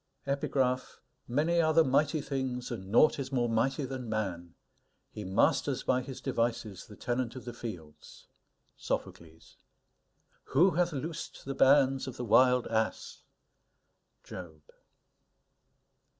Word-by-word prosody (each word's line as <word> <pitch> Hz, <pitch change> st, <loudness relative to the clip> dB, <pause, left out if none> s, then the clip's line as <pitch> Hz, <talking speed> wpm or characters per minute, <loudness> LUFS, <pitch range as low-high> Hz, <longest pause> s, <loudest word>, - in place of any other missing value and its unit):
S._ 140 Hz, 0 st, -2 dB
VELAY 130 Hz, -2 st, +2 dB, 0.5 s
Many 160 Hz, +7 st, +2 dB
are 160 Hz, -1 st, +2 dB
the 165 Hz, -, +7 dB
mighty 145 Hz, +3 st, +2 dB
things, 130 Hz, -3 st, -3 dB
and 95 Hz, -5 st, -6 dB
naught 140 Hz, +8 st, +4 dB
is 135 Hz, 0 st, -4 dB
more 120 Hz, -3 st, +1 dB
mighty 135 Hz, +5 st, 0 dB
than 130 Hz, -2 st, -6 dB
man.... 90 Hz, -6 st, -3 dB, 0.6 s
He 105 Hz, -, -7 dB
masters 110 Hz, +7 st, +1 dB
by 130 Hz, 0 st, +1 dB
his 130 Hz, 0 st, -8 dB
devices 115 Hz, -5 st, -2 dB
the 105 Hz, -, -12 dB
tenant 120 Hz, +3 st, -2 dB
of 130 Hz, -, -9 dB
the 120 Hz, -, -6 dB
fields. 90 Hz, -11 st, -9 dB, 0.5 s
SOPHOCLES. 80 Hz, -1 st, -6 dB, 1.0 s
Who 180 Hz, +7 st, +6 dB
hath 175 Hz, +2 st, +1 dB
loosed 160 Hz, +3 st, -6 dB
the 135 Hz, -, -3 dB
bands 135 Hz, -1 st, +4 dB
of 130 Hz, -1 st, -7 dB
the 125 Hz, -, -4 dB
wild 125 Hz, +2 st, +5 dB
ass? 110 Hz, 0 st, -2 dB, 1.0 s
JOB. 80 Hz, -4 st, -10 dB
125 Hz, 130 wpm, -30 LUFS, 110-140 Hz, 1.0 s, the